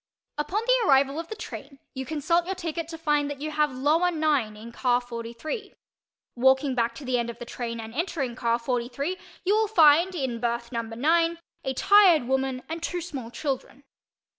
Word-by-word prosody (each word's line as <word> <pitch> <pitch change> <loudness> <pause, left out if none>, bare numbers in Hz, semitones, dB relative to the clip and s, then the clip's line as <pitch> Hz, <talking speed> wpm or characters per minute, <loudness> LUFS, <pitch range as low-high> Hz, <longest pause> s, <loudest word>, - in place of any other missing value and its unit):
Upon 360 +9 -1
the - - +3
arrival 275 +2 +4
of 330 - -5
the 435 - -6
train 275 -8 -8 0.2
you 265 -1 -5
consult 335 +3 +1
your 385 - -2
ticket 330 -2 -4
to 330 -1 -7
find 295 -2 +1
that 285 -1 -6
you 310 +2 -4
have 300 -1 +1
"lower 300 +7 +2
9" 295 -10 0
in 230 +2 -10
car 245 0 +2
43. 245 - -6 0.6
Walking 265 +2 +3
back 235 -2 0
to 275 - -9
the 250 -1 +1
end 235 0 -2
of 235 - -7
the 240 - -8
train 235 -1 -5
and 225 0 -7
entering 285 -5 -2
car 235 -1 +1
43 245 +7 -2 0.3
you 400 +3 +3
will 440 0 +2
find, 340 -1 +5
in 260 -7 -2
berth 235 0 -2
number 230 -2 -4
9, 330 +6 +2 0.3
a 265 - -1
tired 380 -4 +6
woman 265 0 -1
and 325 +1 -5
two 350 +1 -2
small 285 -9 -6
children. 270 +1 -4
280 Hz, 190 wpm, -26 LUFS, 245-330 Hz, 0.6 s, tired